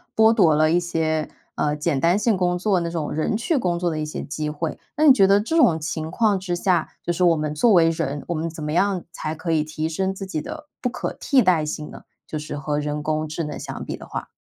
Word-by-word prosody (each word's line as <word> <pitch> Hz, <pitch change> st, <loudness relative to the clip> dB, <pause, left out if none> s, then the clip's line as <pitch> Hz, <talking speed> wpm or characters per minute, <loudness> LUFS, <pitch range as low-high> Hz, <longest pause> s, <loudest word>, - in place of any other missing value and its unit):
剥 220 Hz, 0 st, +6 dB
夺 175 Hz, -9 st, +4 dB
了 155 Hz, +1 st, +3 dB
一 175 Hz, -, +4 dB
些， 160 Hz, -3 st, -1 dB, 0.3 s
呃， 150 Hz, 0 st, 0 dB
简 150 Hz, -2 st, 0 dB
单 170 Hz, +5 st, +3 dB
性 210 Hz, -2 st, +2 dB
工 180 Hz, -1 st, +1 dB
作 190 Hz, 0 st, +1 dB
那 170 Hz, -, -2 dB
种 165 Hz, -3 st, -3 dB
人 155 Hz, +7 st, 0 dB
去 260 Hz, +8 st, 0 dB
工 180 Hz, -8 st, 0 dB
作 175 Hz, 0 st, 0 dB
的 155 Hz, -2 st, -3 dB
一 155 Hz, -, -2 dB
些 150 Hz, -, -5 dB
机 150 Hz, +1 st, -4 dB
会。 155 Hz, +1 st, -4 dB, 0.2 s
那 305 Hz, -, +1 dB
你 280 Hz, -, +9 dB
觉 195 Hz, -7 st, +5 dB
得 200 Hz, +1 st, +5 dB
这 320 Hz, +10 st, -1 dB
种 175 Hz, -, +5 dB
情 160 Hz, 0 st, -3 dB
况 210 Hz, 0 st, +2 dB
之 185 Hz, -2 st, -2 dB
下， 175 Hz, -2 st, +1 dB, 0.2 s
就 175 Hz, -, -1 dB
是 180 Hz, +1 st, +1 dB
我 170 Hz, -2 st, +5 dB
们 150 Hz, -1 st, -2 dB
作 215 Hz, +8 st, +4 dB
为 165 Hz, -2 st, +6 dB
人， 150 Hz, -3 st, -2 dB
我 175 Hz, -, -1 dB
们 165 Hz, +1 st, -2 dB
怎 160 Hz, -1 st, -8 dB
么 150 Hz, -, -3 dB
样 190 Hz, +2 st, +1 dB
才 155 Hz, -1 st, -4 dB
可 165 Hz, +1 st, -3 dB
以 155 Hz, -2 st, +2 dB
提 155 Hz, +1 st, -3 dB
升 190 Hz, +4 st, -1 dB
自 195 Hz, -, -6 dB
己 190 Hz, -5 st, -3 dB
的 300 Hz, -, -8 dB
不 250 Hz, -, 0 dB
可 245 Hz, -, -3 dB
替 275 Hz, -2 st, +3 dB
代 175 Hz, -6 st, +3 dB
性 150 Hz, 0 st, -5 dB
呢？ -, -, -11 dB, 0.2 s
就 155 Hz, -, -5 dB
是 150 Hz, -1 st, -6 dB
和 145 Hz, +1 st, -2 dB
人 150 Hz, 0 st, -3 dB
工 155 Hz, 0 st, -1 dB
智 155 Hz, +2 st, -4 dB
能 150 Hz, -1 st, -5 dB
相 -, -, -6 dB
比 -, -, -5 dB
的 -, -, -11 dB
话。 -, -, -6 dB
165 Hz, 285 characters per minute, -23 LUFS, 155-190 Hz, 0.3 s, 你